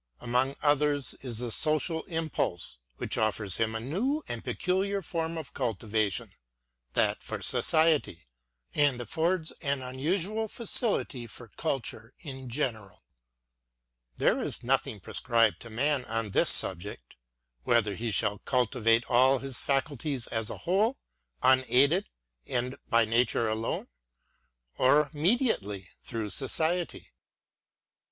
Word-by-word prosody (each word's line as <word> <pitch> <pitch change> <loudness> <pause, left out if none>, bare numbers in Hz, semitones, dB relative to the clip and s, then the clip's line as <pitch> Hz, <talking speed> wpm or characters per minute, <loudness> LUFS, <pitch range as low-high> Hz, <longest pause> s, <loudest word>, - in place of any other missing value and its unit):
Among 125 +3 0
others 145 -1 +2
is 125 -4 -5
the 120 0 -3
social 155 +4 +1
impulse; 155 - -2 0.2
which - - -1
offers 110 -3 0
him 110 -1 0
a - - -1
new 225 - -1
and 120 -1 -5
peculiar 190 +9 -1
form 165 0 -3
of 140 -3 -7
culti 110 -1 -3
vation, 105 -2 0 0.3
— - - -50
that - - +2
for - - -6
society, 155 - +3 0.2
— - - -39
and 145 -4 +3
affords 160 +6 -1
an 140 -4 -1
unusual 180 +12 -1
facility 205 - 0
for 115 +1 -12
culture 115 -4 -3
in 130 -5 -8
general. 115 -7 -3 1.1
There - - +2
is - - -3
nothing - - 0
prescribed 115 -3 +1
to 115 - -9
man 135 +4 +1
on 115 -2 -3
this - - +5
subject; 90 -9 +1 0.2
— - - -48
whether 105 - +2
he 115 +4 -3
shall 105 0 0
cultivate 120 -2 +2
all 130 +2 +5
his 130 -1 -3
faculties 140 -2 -1
as 115 -2 -3
a - - -6
whole, 210 +9 +2 0.5
unaided 130 +7 +4 0.4
and 125 +1 -1
by 115 -1 +4
nature 115 0 +2
alone; 110 +1 -2 0.9
or 145 +3 +4
mediately 145 - +1
through 110 -3 -4
society. 160 +6 -1
130 Hz, 130 wpm, -29 LUFS, 110-155 Hz, 1.1 s, this